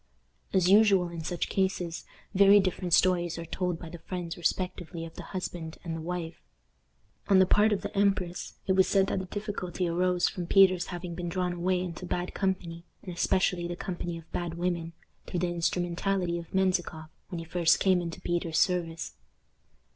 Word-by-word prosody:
As 185 -2 +3
usual 195 -3 +5
in 170 -1 -6
such 175 +1 -2
cases, 185 -3 -1 0.3
very 200 +1 +7
different 185 -2 -1
stories 175 -2 +2
are 170 - -5
told 180 0 -2
by 170 - -9
the 170 +1 -9
friends 175 -1 -5
respectively 175 -1 -2
of 165 - -10
the - - -8
husband 175 -3 -5
and 165 -2 -4
the 165 - -5
wife. 170 0 -5 0.9
On 195 - +5
the 190 - +7
part 210 +3 +4
of 205 - 0
the - - -5
empress 195 -3 0
it - - +1
was 190 0 +4
said 195 -1 +3
that 195 - -1
the 190 - -4
difficulty 185 -3 -3
arose 180 +1 +2
from 175 -2 -4
Peter's 185 -2 +5
having 175 -1 -5
been 175 0 -4
drawn 180 0 -1
away 180 +1 0
into 180 0 -5
bad 175 0 -2
company, 180 -3 -2 0.2
and 180 - -6
especially 175 0 +1
the 175 - -4
company 175 -1 -4
of 165 -1 -14
bad 175 -1 -3
women, 170 -1 -2 0.3
through 175 - -2
the 180 - +1
instrumentality 175 +1 0
of 165 - -11
Menzikoff 180 -4 0 0.2
when 180 - -5
he 165 - -5
first 170 0 +3
came 185 -2 +3
into 170 -1 -5
Peter's 170 -2 -1
service. 170 -3 0
180 Hz, 185 wpm, -29 LUFS, 170-185 Hz, 0.9 s, very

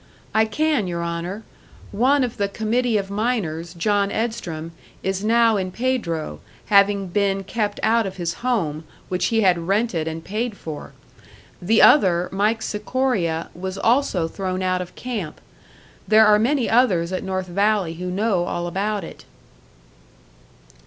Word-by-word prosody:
"I 220 0 +4
can, 295 -2 0
your 170 -1 -3
Honour. 170 +5 -4 0.5
One 260 +7 +3
of 245 - -3
the 200 - +1
committee 225 +2 0
of 195 -1 -3
miners, 190 -7 -2
John 200 +3 +1
Edstrom, 175 -9 -3 0.3
is 190 +1 -2
now 230 0 +4
in 185 -1 -2
Pedro, 175 - -2 0.3
having 200 0 +5
been 195 +1 0
kept 205 0 -2
out 225 -1 +3
of 190 - -7
his 170 -1 -2
home, 170 -12 -1 0.3
which 180 0 0
he 225 -1 +1
had 175 -4 +2
rented 195 -5 0
and 160 0 -5
paid 220 +1 -3
for. 155 -2 -8 0.7
The 220 +6 +4
other, 180 -10 +5
Mike 215 +3 0
Sikoria, 210 -7 -1
was 190 +2 -5
also 225 -7 +2
thrown 185 +1 -3
out 185 0 0
of 180 - -8
camp. 215 -11 -5 0.7
There 220 0 +6
are 210 0 +5
many 255 +3 +1
others 190 -8 +2
at 185 - -2
North 190 -1 -2
Valley 200 -1 +1
who 180 +2 -5
know 190 -1 0
all 175 0 -3
about 200 +4 -2
it." - - -11
200 Hz, 150 wpm, -22 LUFS, 175-225 Hz, 0.7 s, There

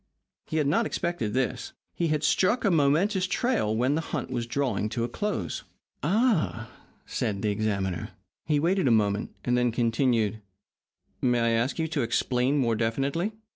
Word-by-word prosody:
He 160 - -2
had 150 - +2
not 220 +11 +2
expected 170 -12 -2
this. 130 -1 -1 0.2
He 170 - 0
had 155 -1 0
struck 205 +10 +2
a 200 - +4
momentous 175 +6 +2
trail 205 - 0
when 125 +4 +2
the 160 - 0
hunt 150 -6 -4
was 120 -2 -2
drawing 130 -4 -1
to 115 +1 -2
a - - 0
close. 120 - -3 0.4
"Ah!" 175 - +1 0.3
said 100 -1 -2
the 105 - +2
examiner. 100 -4 -2 0.4
He 150 -2 +2
waited 175 +1 +2
a 115 -3 +5
moment, 105 -1 0 0.2
and 125 - +2
then 125 -1 +2
continued: 115 -2 +1 0.8
"May 125 -1 +2
I 115 0 +2
ask 115 +4 0
you 160 -1 0
to - - -1
explain 125 +3 +1
more 120 -5 +2
definitely?" 135 - -1
130 Hz, 170 wpm, -27 LUFS, 115-165 Hz, 0.8 s, a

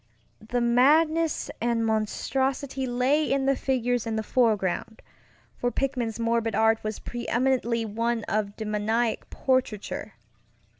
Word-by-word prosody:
The 240 +3 -2
madness 310 +7 +3
and 230 -1 +1
monstrosity 260 +5 -1
lay 255 +5 +1
in 275 0 +1
the 275 0 +3
figures 245 -3 0
in 225 - -1
the 220 - -1
foregroundŌĆöfor 220 +2 -2
Pickman's 250 -5 -1
morbid 230 -1 0
art 225 +1 +3
was 215 0 -3
preeminently 240 -1 -1
one 230 +2 -1
of 210 -1 -2
demoniac 220 +2 -1
portraiture. 240 -5 -1
235 Hz, 110 wpm, -26 LUFS, 220-260 Hz, -, madness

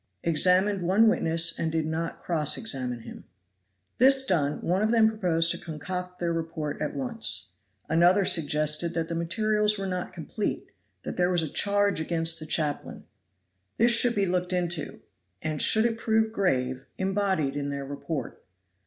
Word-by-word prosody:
Examined 185 +4 +2
one 195 +6 +4
witness 165 -6 +1
and 160 - -1
did 160 -1 -1
not 160 +1 -3
cross 155 -4 +1
examine 130 - -2
him. 115 - -11 0.7
This 265 +1 +6
done, 150 - 0
one 180 +3 0
of 215 - +2
them 225 -1 +5
proposed 175 -6 +1
to - - -3
concoct 180 +3 -6
their 170 -1 -1
report 160 -3 -4
at - - -3
once. 230 - -2 0.4
Another 175 +4 +4
suggested 155 +1 +1
that 165 -1 -2
the - - -3
materials 210 +5 0
were 195 - -4
not 180 -1 -3
complete; 200 +5 -4 0.3
that - - -6
there 180 0 +2
was 175 -2 +1
a - - -2
charge 200 +3 +1
against 165 0 0
the 155 - -8
chaplain. 150 -2 -2 0.7
This 235 +2 +4
should 235 +1 +3
be 200 -1 +2
looked 180 0 -1
into, 175 -3 -1 0.4
and 155 -1 -1
should 220 +1 +4
it 225 -1 -1
prove 220 -1 +1
grave, 130 - -1
embodied 190 -7 0
in 145 0 -3
their 140 -1 -4
report. 140 -1 -6
175 Hz, 160 wpm, -27 LUFS, 155-205 Hz, 0.7 s, This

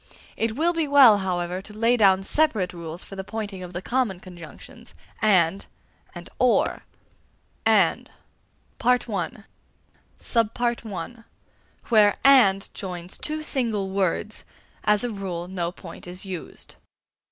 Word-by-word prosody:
It 225 -1 -1
will 335 +5 +2
be 325 -3 0
well, 265 -7 +7
however, 180 -1 -2
to 210 +2 -13
lay 230 +2 +3
down 195 -4 +4
separate 215 -7 +1
rules 170 0 -7
for 195 - -10
the 190 - -5
pointing 205 -2 -6
of 180 -1 -8
the 175 +1 -6
common 240 -8 -1
conjunctions, 175 -3 -12 0.3
and 190 -3 +3 0.5
and - - -8
or. - - +2 0.8
1. - - +3
AND. - - -28 0.7
(a) 220 -5 0 2.5
Where 210 -3 +5
"and" 215 -8 +5
joins 180 -2 -6
two 310 0 -2
single 220 -9 -1
words, 195 +2 -1 0.4
as 210 +1 +3
a 245 - -2
rule 185 -4 -5
no 175 -2 -3
point 175 -2 -11
is 180 +2 -4
used. 185 -3 -8
195 Hz, 125 wpm, -24 LUFS, 180-230 Hz, 2.5 s, well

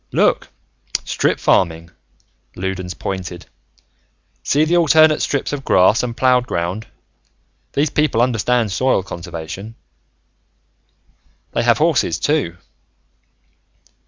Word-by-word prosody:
"Look, - - +2 0.6
strip - - 0
farming," 85 -2 +1 0.6
Loudons 95 -1 -4
pointed. 90 +1 -5 1.0
"See 150 +2 +2
the 170 +2 +1
alternate 155 -2 +5
strips 140 0 -1
of 140 -2 -4
grass 95 +1 +4
and 120 -1 -4
plowed 125 -1 +3
ground. 90 +5 -3 0.9
These 145 +1 +1
people 150 -7 +1
understand 120 -2 +1
soil 115 +1 +1
conservation. 90 +4 -8 1.8
"They - - 0
have - - +3
horses, - - +1
too." 85 +1 -1
110 Hz, 100 wpm, -19 LUFS, 90-130 Hz, 1.8 s, alternate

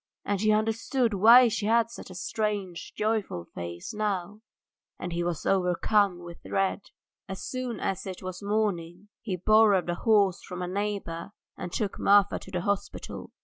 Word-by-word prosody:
And 200 -1 -1
he 215 0 +3
understood 225 +3 +1
why 230 +6 +8
she 210 -2 -1
had 230 0 +3
such - - -10
a 185 - -10
strange, 200 -2 -3
joyful 210 - -1
face 85 0 -6
now, 210 -1 -2 0.6
and 175 -1 -5
he 170 +1 -1
was 170 -2 -3
overcome 185 0 +2
with 170 0 -10
dread. 195 +1 -1 0.4
As 190 - -6
soon 255 -4 -4
as 190 0 -3
it 190 0 -7
was 185 0 -6
morning 200 -3 -2
he 195 -5 -3
borrowed 200 -1 +4
a - - 0
horse 200 -1 +2
from 180 0 -6
a - - -3
neighbour 200 -2 -3 0.2
and 175 - -6
took 205 0 -2
Marfa 200 0 +4
to - - -12
the 180 -2 -2
hospital. 200 +2 -3
200 Hz, 165 wpm, -27 LUFS, 180-215 Hz, 0.6 s, why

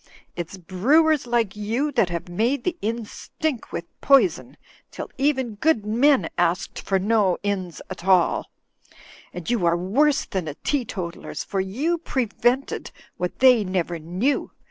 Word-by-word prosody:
It's 175 +2 -5
brewers 260 - +2
like 235 -5 +1
you 230 +8 -1
that 200 -9 +2
have 170 0 -4
made 235 +9 0
the 360 - -1
inns 225 0 -3
stink 300 -8 -4
with 170 - -4 0.2
poison, 280 +6 +3 0.3
till - - -7
even 265 -5 +1
good 300 -10 +2
men 235 - +3
asked 175 +1 0
for 195 - +1
no 200 -2 +2
inns 190 -5 -3
at - - -8
all. 185 -3 +3 0.8
And 175 -2 -8
you 235 -6 0
are 170 0 +3
worse 275 +12 +2
than 190 -4 -3
the 150 -2 -5
teetotalers, 205 -11 -3
for 195 - -3
you 270 - -1
prevented 250 -2 -1 0.3
what 180 0 -3
they 250 -4 +6
never 180 -3 -2
knew. 185 - -1
215 Hz, 145 wpm, -23 LUFS, 180-265 Hz, 0.8 s, they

